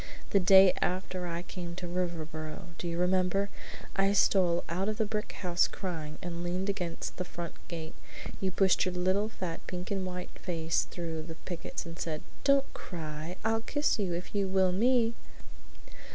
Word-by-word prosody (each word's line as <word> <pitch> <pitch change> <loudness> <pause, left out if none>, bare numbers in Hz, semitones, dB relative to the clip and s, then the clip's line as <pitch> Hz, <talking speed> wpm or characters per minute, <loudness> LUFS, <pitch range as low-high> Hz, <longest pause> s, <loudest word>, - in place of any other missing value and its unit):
The 200 - +6
next 180 - -3
day 190 -1 +9
after 185 0 -1
I 170 0 -3
came 175 -2 -6
to 180 - -5
Riverboro, 170 -1 -3
do 175 - -3
you 170 0 -2
remember, 185 +2 +2 0.4
I 195 0 +3
stole 180 -4 +4
out 185 +5 0
of 215 - -2
the 220 - +2
brick 210 0 -2
house 175 -1 +3
crying, 160 -5 -4
and 175 -1 -3
leaned 180 +3 -1
against 180 -4 -3
the 180 - -1
front 170 -2 -6
gate. 165 -2 -5 0.5
You 190 - +1
pushed 190 0 +4
your 185 -1 -1
little 190 +4 +2
fat 180 -6 -4
pink 180 +1 -4
and 195 -1 0
white 180 -1 -5
face 165 -2 0
through 165 -2 -3
the 160 +1 -7
pickets 175 -1 -4
and 165 0 -8
said: 155 -2 -2 0.2
Don't 275 -1 +4
cry! 160 +1 -6
I'll 225 0 +2
kiss 290 +1 +1
you 185 -4 0
if 175 - -5
you 200 -2 +1
will 190 -1 +3
me!'" 230 +4 +4
180 Hz, 180 wpm, -31 LUFS, 170-195 Hz, 0.5 s, day